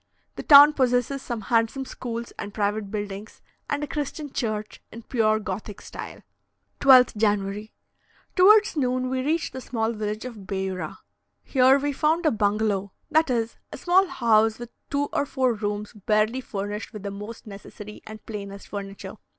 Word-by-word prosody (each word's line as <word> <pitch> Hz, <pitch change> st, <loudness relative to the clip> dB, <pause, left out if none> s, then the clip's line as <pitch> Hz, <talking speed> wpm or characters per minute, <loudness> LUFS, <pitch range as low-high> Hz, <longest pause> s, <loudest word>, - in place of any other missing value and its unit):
The -, -, -5 dB
town 290 Hz, +1 st, +9 dB
possesses 255 Hz, 0 st, +1 dB
some 240 Hz, -4 st, -5 dB
handsome 230 Hz, +5 st, 0 dB
schools 235 Hz, -2 st, -6 dB
and 205 Hz, -1 st, -6 dB
private 205 Hz, -1 st, -1 dB
buildings, 205 Hz, 0 st, -6 dB, 0.3 s
and 285 Hz, +1 st, -1 dB
a -, -, -3 dB
Christian 295 Hz, -1 st, -5 dB
church, 215 Hz, -3 st, -3 dB
in 230 Hz, +1 st, -10 dB
pure 215 Hz, -3 st, +2 dB
Gothic 205 Hz, 0 st, -6 dB
style. -, -, -9 dB, 0.6 s
12th 255 Hz, -4 st, +6 dB
January. 210 Hz, 0 st, -1 dB, 0.6 s
Towards 410 Hz, +2 st, +6 dB
noon, 255 Hz, -2 st, 0 dB
we 260 Hz, 0 st, 0 dB
reached 315 Hz, +4 st, -1 dB
the 260 Hz, -, -6 dB
small 225 Hz, -2 st, -2 dB
village 215 Hz, 0 st, -4 dB
of 215 Hz, -6 st, -9 dB
Beura. 190 Hz, -4 st, -4 dB, 0.5 s
Here 260 Hz, 0 st, +4 dB
we 285 Hz, +1 st, -1 dB
found 315 Hz, +5 st, +1 dB
a 310 Hz, -, +4 dB
bungalow; 205 Hz, -2 st, 0 dB, 0.2 s
that 315 Hz, 0 st, +3 dB
is, 230 Hz, -2 st, -1 dB
a -, -, -7 dB
small 375 Hz, +2 st, +3 dB
house 225 Hz, -5 st, +2 dB
with 240 Hz, 0 st, -9 dB, 0.2 s
two 285 Hz, 0 st, 0 dB
or 285 Hz, -, 0 dB
four 260 Hz, -2 st, +1 dB
rooms 210 Hz, 0 st, -4 dB
barely 215 Hz, +4 st, 0 dB
furnished 205 Hz, -1 st, -5 dB
with 210 Hz, -2 st, -8 dB
the 200 Hz, -, -4 dB
most 210 Hz, +4 st, -8 dB
necessary 210 Hz, 0 st, -10 dB
and 215 Hz, 0 st, -10 dB
plainest 200 Hz, -2 st, -8 dB
furniture. 200 Hz, 0 st, -7 dB
225 Hz, 160 wpm, -25 LUFS, 205-260 Hz, 0.6 s, town